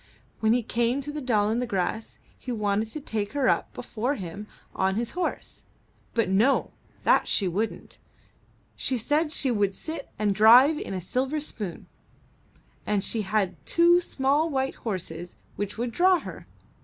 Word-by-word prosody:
When 220 Hz, 0 st, +2 dB
he 245 Hz, 0 st, +1 dB
came 235 Hz, +4 st, 0 dB
to 295 Hz, +2 st, -6 dB
the 300 Hz, 0 st, -5 dB
Doll 215 Hz, -5 st, +2 dB
i' -, -, +1 dB
the 245 Hz, +2 st, -1 dB
Grass 200 Hz, +3 st, -2 dB, 0.2 s
he 255 Hz, -, -7 dB
wanted 210 Hz, -1 st, 0 dB
to 305 Hz, -, -4 dB
take 215 Hz, -6 st, -3 dB
her 280 Hz, -3 st, +1 dB
up -, -, +1 dB
before 245 Hz, +4 st, -3 dB
him 200 Hz, +1 st, -7 dB, 0.3 s
on 190 Hz, 0 st, +1 dB
his 235 Hz, +2 st, -2 dB
horse; 360 Hz, 0 st, -4 dB, 0.5 s
but 230 Hz, -4 st, +2 dB
no, 210 Hz, +9 st, +2 dB, 0.3 s
that -, -, +4 dB
she 195 Hz, -, +2 dB
wouldn't; 205 Hz, +6 st, -3 dB, 0.8 s
she 260 Hz, -, 0 dB
said 295 Hz, +7 st, 0 dB
she 270 Hz, -4 st, 0 dB
would 200 Hz, -4 st, +1 dB
sit 315 Hz, +3 st, -5 dB
and 210 Hz, -1 st, +1 dB
drive 245 Hz, +9 st, +7 dB
in 195 Hz, -, -5 dB
a 185 Hz, -, -3 dB
silver 265 Hz, -, -1 dB
spoon, 210 Hz, -, -6 dB, 1.0 s
and 205 Hz, -2 st, 0 dB
she 225 Hz, -, 0 dB
had 190 Hz, -6 st, -1 dB
two 345 Hz, -, +4 dB
small 290 Hz, 0 st, +1 dB
white 270 Hz, -2 st, -1 dB
horses 175 Hz, -5 st, -5 dB, 0.2 s
which 205 Hz, +1 st, -4 dB
would 240 Hz, +1 st, -2 dB
draw 365 Hz, +6 st, +4 dB
her. -, -, -9 dB
230 Hz, 170 wpm, -26 LUFS, 205-275 Hz, 1.0 s, drive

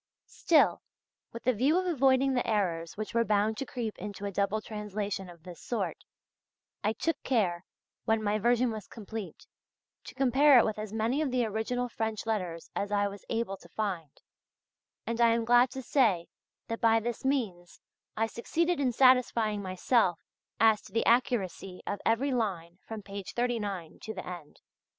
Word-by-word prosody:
Still, 320 Hz, -3 st, +3 dB, 0.5 s
with 230 Hz, -, -8 dB
the 255 Hz, -, +3 dB
view 270 Hz, -, +2 dB
of 370 Hz, -, 0 dB
avoiding 270 Hz, -5 st, +3 dB
the 245 Hz, -, 0 dB
errors 175 Hz, -6 st, -1 dB
which 215 Hz, +1 st, -5 dB
were 230 Hz, 0 st, +3 dB
bound 215 Hz, 0 st, +1 dB
to 270 Hz, -, -4 dB
creep 230 Hz, -4 st, -4 dB
into 205 Hz, -1 st, -6 dB
a 200 Hz, -, -2 dB
double 200 Hz, +2 st, 0 dB
translation 210 Hz, -3 st, -4 dB
of 170 Hz, -2 st, -14 dB
this 175 Hz, -2 st, -10 dB
sort, 240 Hz, -, -2 dB, 0.9 s
I 215 Hz, -, +1 dB
took 330 Hz, +9 st, -2 dB
care, 190 Hz, -9 st, 0 dB, 0.4 s
when 220 Hz, 0 st, +1 dB
my 210 Hz, +1 st, +1 dB
version 240 Hz, +2 st, +2 dB
was 215 Hz, -3 st, -7 dB
complete, 215 Hz, -5 st, -8 dB, 0.6 s
to -, -, -10 dB
compare 270 Hz, +2 st, +5 dB
it 235 Hz, -, +6 dB
with 215 Hz, -1 st, -2 dB
as 215 Hz, -1 st, -5 dB
many 225 Hz, +6 st, 0 dB
of 300 Hz, -, 0 dB
the 250 Hz, -2 st, +1 dB
original 220 Hz, +3 st, -2 dB
French 220 Hz, -2 st, -3 dB
letters 180 Hz, -7 st, -3 dB
as 200 Hz, +1 st, -2 dB
I 205 Hz, 0 st, +2 dB
was 200 Hz, 0 st, -9 dB
able 225 Hz, -4 st, -2 dB
to -, -, -17 dB
find, 185 Hz, -8 st, -3 dB, 1.0 s
and 230 Hz, 0 st, -2 dB
I 230 Hz, -1 st, +5 dB
am 230 Hz, -1 st, -1 dB
glad 245 Hz, +2 st, +5 dB
to 265 Hz, +1 st, -7 dB
say 225 Hz, -, +2 dB, 0.4 s
that 230 Hz, -, -4 dB
by 225 Hz, -1 st, +5 dB
this 235 Hz, +1 st, -4 dB
means 215 Hz, -11 st, -2 dB, 0.4 s
I 225 Hz, -, +2 dB
succeeded 330 Hz, +9 st, -1 dB
in 265 Hz, -3 st, +2 dB
satisfying 235 Hz, -5 st, +4 dB
myself 185 Hz, -1 st, +1 dB, 0.4 s
as 220 Hz, -2 st, +5 dB
to -, -, -15 dB
the 230 Hz, -, 0 dB
accuracy 195 Hz, -6 st, 0 dB
of 205 Hz, -, -3 dB
every 245 Hz, +5 st, +2 dB
line 185 Hz, -8 st, -2 dB
from 220 Hz, -2 st, -6 dB
page 200 Hz, -1 st, -7 dB
39 210 Hz, -8 st, -2 dB
to 220 Hz, -, -6 dB
the 185 Hz, -, -6 dB
end. 175 Hz, -5 st, -9 dB
220 Hz, 175 wpm, -30 LUFS, 200-245 Hz, 1.0 s, it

